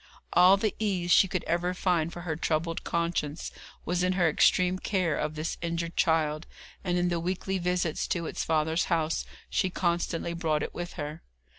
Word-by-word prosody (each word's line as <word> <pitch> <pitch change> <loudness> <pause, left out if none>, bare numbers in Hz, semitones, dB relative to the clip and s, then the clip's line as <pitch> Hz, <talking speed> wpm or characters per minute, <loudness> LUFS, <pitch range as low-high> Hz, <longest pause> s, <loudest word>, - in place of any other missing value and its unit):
All 180 +3 +7
the 210 +1 0
ease 185 -5 0
she 190 - +7
could 185 -1 -2
ever 175 +2 0
find 170 -3 +1
for 175 - -8
her 165 -3 -3
troubled 165 +1 -1
conscience 170 -2 -2 0.3
was 175 +1 0
in 180 +1 +2
her 180 -2 +3
extreme 180 +4 +3
care 185 -7 0
of 150 +1 -2
this 155 +2 -3
injured 170 0 -3
child, 155 -1 +1 0.4
and 180 -2 0
in 175 0 +2
the 170 -1 0
weekly 185 +2 -2
visits 180 -2 0
to 170 -2 -1
its - - -3
father's 160 +1 +1
house 165 -2 0 0.2
she 190 - 0
constantly 170 -1 -1
brought 160 -3 0
it - - -5
with 175 0 -5
her. 150 0 -6
170 Hz, 180 wpm, -28 LUFS, 160-180 Hz, 0.4 s, All